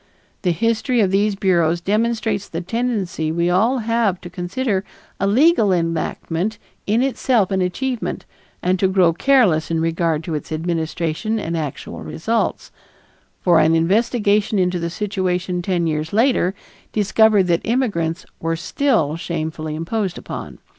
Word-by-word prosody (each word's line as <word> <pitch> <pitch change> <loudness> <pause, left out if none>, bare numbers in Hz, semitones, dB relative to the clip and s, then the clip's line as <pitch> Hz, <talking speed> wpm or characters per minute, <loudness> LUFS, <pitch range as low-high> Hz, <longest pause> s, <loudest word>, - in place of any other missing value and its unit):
The 180 - +1
history 230 - +1
of 195 -4 +3
these 200 +1 +2
bureaus 175 -4 +2
demonstrates 215 +1 -1
the 165 - -4
tendency 195 -6 -2
we 170 +2 +1
all 225 +9 +3
have 230 -5 +1
to 175 - -9
consider 190 +3 -2 0.4
a 195 - +1
legal 250 - +4
enactment 170 +3 -1 0.3
in 220 +5 +2
itself 250 -6 +1
an 190 -1 +1
achievement 240 +7 -2 0.4
and 185 +1 +1
to 190 - +3
grow 185 -3 +3
careless 190 - +3
in 165 -1 0
regard 165 -1 0
to 165 - -4
its 150 - -5
administration 165 +5 -2
and 170 -4 -3
actual 150 -4 -5
results; 225 +9 -2 0.7
for 175 -3 +4
an 160 +1 +4
investigation 205 +3 +2
into 180 -1 +1
the 170 0 -2
situation 185 -2 -2
ten 175 -1 0
years 155 0 -2
later 220 -4 +2 0.4
discovered 215 0 +4
that 175 -2 +1
immigrants 195 -9 -1
were 165 0 -1
still 170 - 0
shamefully 160 -2 -4
imposed 185 +4 -2
upon. - - -7
185 Hz, 140 wpm, -20 LUFS, 165-220 Hz, 0.7 s, legal